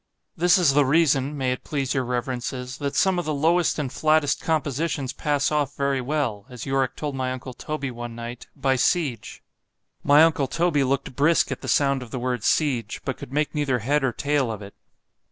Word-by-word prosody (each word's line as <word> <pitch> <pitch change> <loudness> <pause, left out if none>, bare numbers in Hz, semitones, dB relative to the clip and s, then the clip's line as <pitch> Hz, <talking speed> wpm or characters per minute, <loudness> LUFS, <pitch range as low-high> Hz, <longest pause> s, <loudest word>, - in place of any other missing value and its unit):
—This 175 +3 +4
is 170 -7 +4
the 145 +1 +5
reason, 145 -1 +2
may 130 -2 0
it 125 - -4
please 135 -3 -2
your 130 - 0
reverences, 125 +1 -4
that 140 -2 -3
some 190 -2 +3
of 175 - -3
the 155 -1 -1
lowest 165 +4 +2
and 140 -4 -3
flattest 155 -2 +2
compositions 150 -3 -1
pass 145 -1 0
off 145 -2 0
very 140 -1 0
well——(as 125 -4 -3
Yorick 135 -2 0
told 150 -2 -4
my 130 -1 -2
uncle 130 0 -6
Toby 140 +1 -4
one 120 -1 -7
night) 120 +1 -7
by 135 -2 +1
siege.——My 145 - 0
uncle 155 -4 +2
Toby 165 -1 +1
looked 135 -1 -1
brisk 155 +4 +3
at - - -4
the - - -7
sound 140 -2 +2
of 125 - -9
the 130 - -5
word 125 -2 -2
siege, 125 -8 0
but 135 - -3
could - - -9
make 150 +2 0
neither 145 -4 0
head 135 +5 0
or 130 - +2
tail 140 -1 0
of 105 -2 -6
it. 100 - -11
140 Hz, 195 wpm, -24 LUFS, 125-150 Hz, -, the